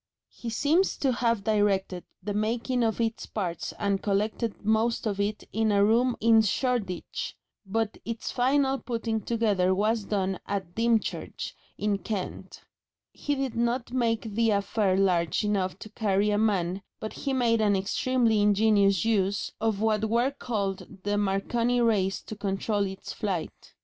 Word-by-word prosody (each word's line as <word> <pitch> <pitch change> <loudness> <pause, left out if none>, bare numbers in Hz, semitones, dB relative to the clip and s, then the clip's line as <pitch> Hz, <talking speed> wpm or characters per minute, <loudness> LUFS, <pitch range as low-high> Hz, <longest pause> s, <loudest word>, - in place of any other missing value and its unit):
He 235 - -7
seems 300 +11 +2
to 270 - +1
have 235 -4 0
directed 200 -4 +1 0.2
the 205 +1 -3
making 235 +4 0
of 225 0 0
its 225 -1 -1
parts 175 -6 -3
and 200 -1 0
collected 210 +2 -1
most 220 +2 +1
of 200 -2 -1
it 205 +1 -1
in 220 0 +2
a 200 0 +4
room 235 +3 +3
in 225 0 +5
Shoreditch, 220 -4 -2 0.3
but 225 +2 -1
its 230 0 -4
final 270 +2 +2
putting 230 -2 -2
together 205 -6 +1
was 215 +2 +1
done 190 -2 -1
at 190 -3 -3
Dymchurch, 230 0 -1 0.2
in 205 -1 0
Kent. 195 0 -5 0.5
He 290 - -2
did 270 -3 -2
not 235 +1 -1
make 230 -3 0
the 225 +1 +2
affair 200 -1 +1
large 180 -3 +2
enough 195 -3 0
to 215 - -10
carry 210 -2 +1
a 205 - +2
man, 195 -4 +1 0.2
but 215 - -5
he 275 - -3
made 235 -4 +2
an 205 -2 +3
extremely 225 +3 +1
ingenious 205 -2 +3
use 200 -3 +1
of 220 -2 0
what 220 -1 +2
were 235 +4 +2
then - - -25
called 200 -5 -2 0.2
the 205 0 0
Marconi 230 +5 +1
rays 205 -5 +1
to 215 - -7
control 200 0 -1
its 190 0 -7
flight. 195 -7 -4
215 Hz, 155 wpm, -27 LUFS, 200-230 Hz, 0.5 s, in